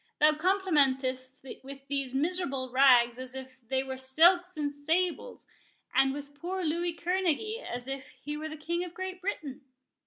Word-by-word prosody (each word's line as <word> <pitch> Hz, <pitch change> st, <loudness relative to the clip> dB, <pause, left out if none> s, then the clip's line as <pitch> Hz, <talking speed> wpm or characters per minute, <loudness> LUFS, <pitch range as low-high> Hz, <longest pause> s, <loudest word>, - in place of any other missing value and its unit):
—thou 305 Hz, +1 st, +6 dB
complimentest 285 Hz, -8 st, +1 dB, 0.3 s
with 275 Hz, 0 st, -11 dB
these 275 Hz, -2 st, -2 dB
miserable 275 Hz, -4 st, -1 dB
rags 250 Hz, -2 st, +5 dB
as 255 Hz, 0 st, -5 dB
if 260 Hz, 0 st, -9 dB
they 265 Hz, 0 st, +1 dB
were 265 Hz, -1 st, -5 dB
silks 340 Hz, +7 st, +4 dB
and 290 Hz, -1 st, -1 dB
sables, 335 Hz, +10 st, -1 dB, 0.5 s
and 270 Hz, 0 st, +4 dB
with 285 Hz, +1 st, -7 dB
poor 360 Hz, +6 st, -4 dB
Louis 340 Hz, +2 st, 0 dB
Kerneguy 380 Hz, +6 st, -1 dB
as 245 Hz, +1 st, -5 dB
if 270 Hz, 0 st, -5 dB
he 290 Hz, +4 st, -7 dB
were 310 Hz, +1 st, -5 dB
the 310 Hz, -, -7 dB
King 340 Hz, +3 st, -2 dB
of 355 Hz, -1 st, -8 dB
Great 375 Hz, 0 st, -5 dB
Britain!" 300 Hz, -8 st, -4 dB
290 Hz, 160 wpm, -29 LUFS, 265-350 Hz, 0.5 s, thou